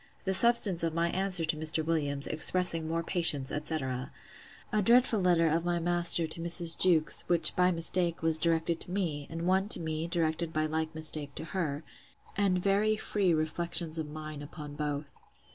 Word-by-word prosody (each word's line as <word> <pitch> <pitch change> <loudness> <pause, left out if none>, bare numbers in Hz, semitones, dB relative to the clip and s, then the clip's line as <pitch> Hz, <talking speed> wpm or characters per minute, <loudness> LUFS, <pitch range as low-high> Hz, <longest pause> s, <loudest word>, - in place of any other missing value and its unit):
The 190 - 0
substance 205 -4 +4
of 165 -1 -2
my 170 0 0
answer 185 -3 +1
to 160 0 -1
Mr. 155 0 0
Williams, 145 -3 -2
expressing 165 0 +2
more 165 +1 -2
patience, 160 -6 +1
etc. 135 -4 -2 0.6
A 215 - +1
dreadful 235 +1 +3
letter 175 -3 +2
of 165 +2 0
my 175 0 -1
master 175 0 +1
to 160 +1 -5
Mrs. 170 0 +2
Jewkes; 165 -4 +2
which, 165 -3 +2
by 180 0 +3
mistake, 170 0 +1
was 160 -1 +2
directed 165 0 0
to - - -3
me; 160 -7 -3
and 165 +1 -6
one 190 +2 +1
to - - +2
me, 160 0 -4
directed 165 -1 -2
by 155 -1 -1
like 160 +1 -3
mistake 155 -2 -1
to - - -6
her; 155 -3 -4 0.5
and 195 -2 +1
very 200 +4 +1
free 200 -4 0
reflections 165 +1 -2
of 155 -2 -5
mine 155 -1 -8
upon 145 0 -9
both. 145 -1 -4
165 Hz, 180 wpm, -29 LUFS, 155-180 Hz, 0.6 s, substance